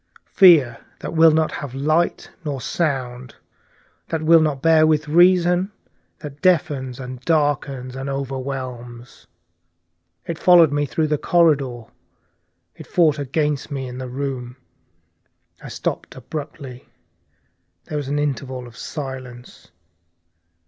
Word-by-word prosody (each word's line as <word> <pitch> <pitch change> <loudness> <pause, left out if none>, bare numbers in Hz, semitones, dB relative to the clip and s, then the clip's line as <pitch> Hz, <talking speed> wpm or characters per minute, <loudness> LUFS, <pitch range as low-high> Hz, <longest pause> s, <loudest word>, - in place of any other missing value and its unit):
Fear 155 -11 +6 0.2
that - - -5
will 165 0 +6
not 155 0 +1
have 135 -3 -7
light 155 +5 0
nor 145 -4 -4
sound, 130 -5 -3 0.7
that 160 -1 -2
will 165 +1 +6
not 150 -3 0
bear 160 +1 +4
with 155 -1 +1
reason, 180 +3 +4 0.5
that 145 -5 -10
deafens 150 -9 +1
and 130 -1 -8
darkens 140 -4 -1
and 135 +1 -5
overwhelms. 130 -3 -6 1.0
It 165 - -5
followed 175 -4 +6
me 145 0 0
through 155 +4 -1
the 150 -1 -1
corridor, 140 -8 +2 0.9
it - - -12
fought 155 -4 +2
against 145 +1 -2
me 135 -3 -4
in 125 0 -8
the 130 -1 -6
room 125 -2 -5 0.5
" - - -41
I - - -9
stopped - - -5
abruptly. 135 -1 -8 1.0
There 150 - -5
was 140 - -6
an 145 +1 -1
interval 135 -3 -3
of 120 -1 -14
silence. 130 -5 -8
140 Hz, 125 wpm, -21 LUFS, 130-160 Hz, 1.0 s, Fear